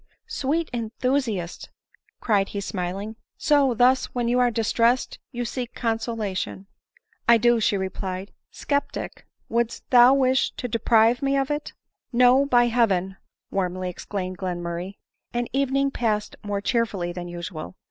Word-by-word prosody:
" - - -61 0.2
Sweet 310 +4 0
enthusiast 230 -5 -2 0.3
!" - - -41
cried 200 -4 +2
he 200 - -4
smiling: 195 +3 -4
" - - -68
so, 280 -4 +3
thus, 250 +3 +4
when 240 -1 0
you 245 +1 +2
are 245 -1 +4
distressed, 230 +2 +1
you 245 -2 -3
seek 245 +1 -5
consolation." 225 -5 -2 0.3
" - - -13
I 235 - +8
do," 240 +1 +3
she 210 -2 +2
replied: 190 0 -4
" - - -59
Sceptic, 285 -1 -3 0.2
wouldst 235 0 -1
thou 250 +1 +8
wish 260 -1 +2
to 250 - -4
deprive 230 0 +3
me 275 0 +1
of 270 +1 0
it 295 0 -3 0.2
?" - - -58
u - - -3
No, 250 +3 +6
by 245 -3 +5
heaven 195 -6 +1 0.2
!" - - -58
warmly 185 -1 -2
exclaimed 185 0 -5
filenmurray; 175 0 -4 0.4
and 240 0 0
the 270 - +1
evening 275 0 +1
passed 215 -5 -1
more 205 -1 -2
cheerfully 205 -7 0
than 175 0 -6
usual. 170 - -7
230 Hz, 165 wpm, -24 LUFS, 190-250 Hz, 0.4 s, I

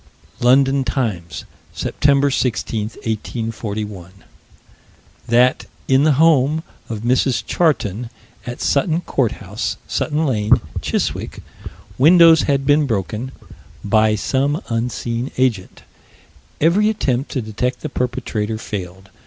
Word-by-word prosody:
London 135 +2 +4
Times, 110 -10 -3 0.3
Sept. 140 -1 +2
16, 115 -3 -1 0.2
1841: 105 -4 -4 1.2
That, 125 +2 +3 0.2
in 135 +2 +4
the 155 - +4
home 155 0 +3 0.3
of 110 -3 -4
Mrs. 125 +2 +1
Charton, 120 - 0 0.4
at 120 - -6
Sutton 160 +4 +1
Courthouse, 110 - -2
Sutton 155 +1 -1
Lane, 110 -6 +2 0.3
Chiswick, - - -3 0.6
windows 165 +2 +7
had 140 -1 +1
been 145 +1 +3
broken 110 +3 -3 0.5
"by 110 +1 +3
some 135 - -1
unseen 115 +1 -2
agent." 120 -8 -1 0.8
Every 190 +7 +3
attempt 135 - -1
to 130 - -1
detect 125 +4 -3
the - - -3
perpetrator 115 -4 -2
failed. 95 -3 -7
125 Hz, 105 wpm, -19 LUFS, 110-140 Hz, 1.2 s, windows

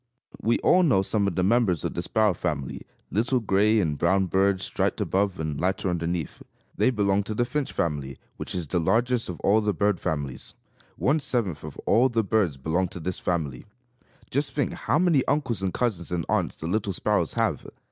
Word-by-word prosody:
We 115 +2 +2
all 185 - +5
know 130 - +3
some 100 0 0
of 95 - -2
the 90 - +1
members 100 -5 +2
of - - -2
the 85 - -2
Sparrow 105 +3 +2
family, 70 -5 -4 0.2
little 120 +5 +1
gray 110 0 +3
and 75 -7 -1
brown 95 +3 +3
birds, 95 +1 +1
striped - - -1
above 95 0 0
and 75 -3 -3
lighter 95 +1 0
underneath. 85 -2 -3 0.3
They - - +3
belong 100 -4 +2
to 110 - -4
the 120 - +1
Finch 135 +3 -2
family, 70 -5 -2 0.2
which - - -5
is 90 -2 -2
the 90 +4 -1
largest 120 +6 +1
of 90 - -6
all 105 +3 +4
the 105 -2 0
bird 100 -1 +1
families. 70 -4 -4 0.4
One 145 +4 +2
seventh 110 - -2
of 75 -2 -8
all 125 +4 +4
the 115 -2 +1
birds 100 -8 +1
belong 80 +7 0
to 90 0 -9
this 90 +2 -3
family. 80 - -2 0.6
Just 140 +3 -1
think 145 - 0
how - - 0
many 165 -6 +3
uncles 135 -8 0
and 95 -1 0
cousins 100 -9 -2
and 85 -3 -1
aunts - - 0
the - - -8
little 100 +3 -1
sparrows - - 0
have! - - -1
95 Hz, 200 wpm, -26 LUFS, 85-115 Hz, 0.6 s, all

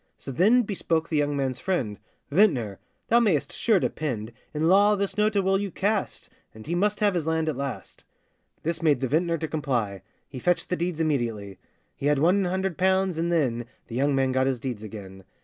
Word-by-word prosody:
So 135 - -7
then 215 - +4
bespoke 165 -6 -1
the 155 - 0
young 145 -1 +1
man's 130 -2 -1
friend: 130 - -2 0.3
'Vintner! 140 - +2 0.3
thou 235 - +6
mayest 200 -11 +1
sure 220 -5 +2
depend, 120 -10 -3 0.2
In 155 +1 0
law 205 +3 +5
this 195 -1 -2
note 210 +1 +1
it 200 - +4
will 195 0 +2
you 200 0 -2
cast, 200 +3 -2 0.3
And 110 - -11
he 165 - -3
must 205 +4 0
have 205 -2 +3
his 165 -3 -2
land 160 0 0
at 155 - 0
last.' 140 -3 -6 0.6
This 165 +1 -2
made 150 -5 +3
the 130 - 0
vintner 165 +5 +1
to 160 - -3
comply,— 125 -11 -2 0.3
He 130 - -8
fetched 175 +6 0
the 180 - +1
deeds 175 -1 -2
immediately; 115 - -2 0.4
He 140 - -2
had 150 0 +3
one 180 +7 +3
hundred 190 -1 -2
pounds, 190 -2 +2
and 170 +1 0
then 125 -8 0 0.2
The 115 - -6
young 140 +2 +2
man 135 -1 +2
got 130 0 +1
his 130 -2 0
deeds 120 -3 -4
again. 100 -3 -9
160 Hz, 205 wpm, -26 LUFS, 130-190 Hz, 0.6 s, thou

